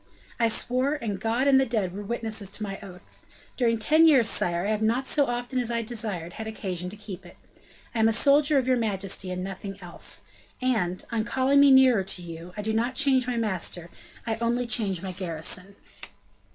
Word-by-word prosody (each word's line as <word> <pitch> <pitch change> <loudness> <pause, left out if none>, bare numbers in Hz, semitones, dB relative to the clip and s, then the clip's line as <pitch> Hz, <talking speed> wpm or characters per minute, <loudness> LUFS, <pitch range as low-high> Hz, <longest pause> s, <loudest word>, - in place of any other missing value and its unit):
I 230 - +4
swore, 255 +5 +1
and 220 -9 -4
God 235 +4 0
and 270 -1 +6
the 265 - +3
dead 210 -6 -1
were 200 - -6
witnesses 220 -2 -3
to 215 - -4
my 195 -1 -5
oath. 180 -3 -14 0.3
During 230 -3 +1
ten 310 +9 +5
years, 265 -8 +5
sire, 175 -2 +1
I 210 - 0
have 215 0 -1
not 235 +5 +1
so 285 +1 +2
often 245 +1 -2
as 240 -2 -1
I 230 -1 -1
desired 210 -7 -3
had 220 - -6
occasion 185 -5 -5
to 200 - -9
keep 200 -3 -9
it. - - -15 0.6
I 235 - -2
am 220 - +5
a - - +3
soldier 285 +5 +4
of 260 -2 +1
your 255 -1 +3
majesty, 195 -4 -1
and 180 0 -4
nothing 195 +1 -6
else; 175 -2 -3 0.4
and, 215 -9 -1
on 225 -2 0
calling 265 +4 +2
me 280 0 +7
nearer 260 -6 +6
to 185 -1 -3
you, 170 +1 -9
I 210 - -4
do 220 +1 -1
not 240 +4 0
change 260 -2 +3
my 245 -1 -1
master, 185 -5 -2 0.3
I 225 -1 -2
only 235 +2 0
change 210 -6 0
my 190 - -4
garrison." 180 +2 -3
220 Hz, 205 wpm, -26 LUFS, 190-250 Hz, 0.6 s, me